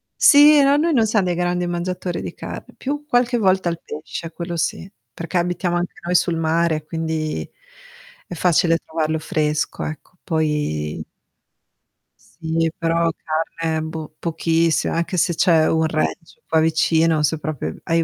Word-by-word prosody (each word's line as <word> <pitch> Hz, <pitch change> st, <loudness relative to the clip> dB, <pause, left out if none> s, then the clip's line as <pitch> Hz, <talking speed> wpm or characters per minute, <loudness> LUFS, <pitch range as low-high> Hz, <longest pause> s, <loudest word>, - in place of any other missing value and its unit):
Sì. 295 Hz, 0 st, +7 dB
No, 275 Hz, +1 st, +4 dB
noi 325 Hz, +1 st, +2 dB
non 230 Hz, -4 st, +4 dB
siam 210 Hz, -2 st, +2 dB
dei 175 Hz, -1 st, 0 dB
grandi 175 Hz, 0 st, -1 dB
mangiatori 175 Hz, +1 st, -3 dB
di -, -, -6 dB
carn -, -, -7 dB
più 290 Hz, +2 st, -4 dB
qualche 245 Hz, -2 st, +2 dB
volta 190 Hz, -4 st, +2 dB
il 170 Hz, -, -4 dB
pesce 160 Hz, +2 st, -7 dB
quello 170 Hz, 0 st, -5 dB
sì, 185 Hz, -, -2 dB, 0.2 s
perché 170 Hz, +2 st, -4 dB
abitiamo 175 Hz, 0 st, 0 dB
anche 175 Hz, 0 st, -3 dB
noi 180 Hz, +1 st, 0 dB
sul 170 Hz, -1 st, +2 dB
mare, 160 Hz, -1 st, 0 dB
quindi 160 Hz, -1 st, -3 dB, 0.8 s
è -, -, -7 dB
facile 165 Hz, -1 st, +3 dB
trovarlo 160 Hz, -1 st, -2 dB
fresco, 150 Hz, -3 st, -1 dB
ecco. 155 Hz, +3 st, -8 dB
Poi 150 Hz, -, -1 dB, 1.2 s
Sì, 165 Hz, -1 st, -2 dB
però 165 Hz, -1 st, +1 dB
carne 160 Hz, 0 st, -2 dB
boh, 160 Hz, -1 st, -6 dB
pochissi 165 Hz, -1 st, +1 dB
anche 170 Hz, +2 st, -1 dB
se 170 Hz, 0 st, +2 dB
c'è 160 Hz, -2 st, +4 dB
un 160 Hz, 0 st, +2 dB
ranch 160 Hz, +1 st, -2 dB
qua 160 Hz, 0 st, +3 dB
vicino, 160 Hz, 0 st, +2 dB
se 155 Hz, +1 st, +1 dB
proprio 150 Hz, -, -4 dB
hai 165 Hz, 0 st, +1 dB
165 Hz, 150 wpm, -21 LUFS, 160-180 Hz, 1.2 s, Sì